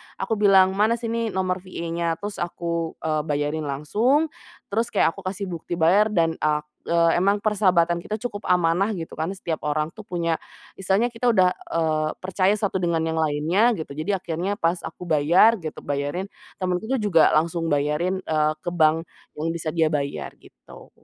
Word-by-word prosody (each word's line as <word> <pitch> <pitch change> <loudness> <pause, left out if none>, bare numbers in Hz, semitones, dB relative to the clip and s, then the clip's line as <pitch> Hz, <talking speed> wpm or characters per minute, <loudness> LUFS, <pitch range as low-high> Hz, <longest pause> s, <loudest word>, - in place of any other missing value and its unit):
aku 220 -2 -2
bilang, 190 -2 +6
"Mana 215 +4 +2
sini 230 0 -2
nomor 190 -2 -1
VA-nya." 170 -2 -3
Terus 205 0 -5
aku, 170 -1 -3
eee, 155 -1 0
bayarin 150 +1 -1
langsung, 225 - +1 0.4
terus 225 +3 +1
kayak - - +3
aku 195 - -11
kasih 195 +1 -4
bukti 170 0 -5
bayar, 195 +7 +4
dan 165 -3 +2
ak 150 0 +1
eee, 170 -1 +2
emang 200 +2 +3
persahabatan 180 -5 +2
kita 215 +5 -4
cukup 210 -2 -5
amanah 180 +3 +3
gitu 165 -1 -7
kan, 160 +2 -3
setiap 165 -3 -4
orang 155 +2 -1
tuh 220 - -10
punya 170 -5 -2 0.3
misalnya 195 +6 0
kita 240 +1 +1
udah, 185 -5 +4
eee, 155 -2 -1
percaya 190 +2 +1
satu 200 -3 -1
dengan 165 -2 0
yang 160 0 -1
lainnya, 160 +9 +2
gitu, 155 -3 -6
jadi 155 +7 -1
akhirnya 180 +3 -3
pas 170 -2 0
aku 180 - -8
bayar, 175 +8 +4
gitu 155 -2 -6
bayarin, 145 +6 -2 0.3
temenku 185 +3 -2
tuh 265 - +1
juga 200 -8 +4
langsung 165 +1 0
bayarin, 150 +6 0
eee, 155 -1 +1
ke 175 - 0
bank 160 0 +3 0.3
yang 155 +2 -2
bisa 165 -1 -3
dia 160 -1 +1
bayar, 140 -1 -3
gitu. - - -16
170 Hz, 175 wpm, -24 LUFS, 160-200 Hz, 0.4 s, bilang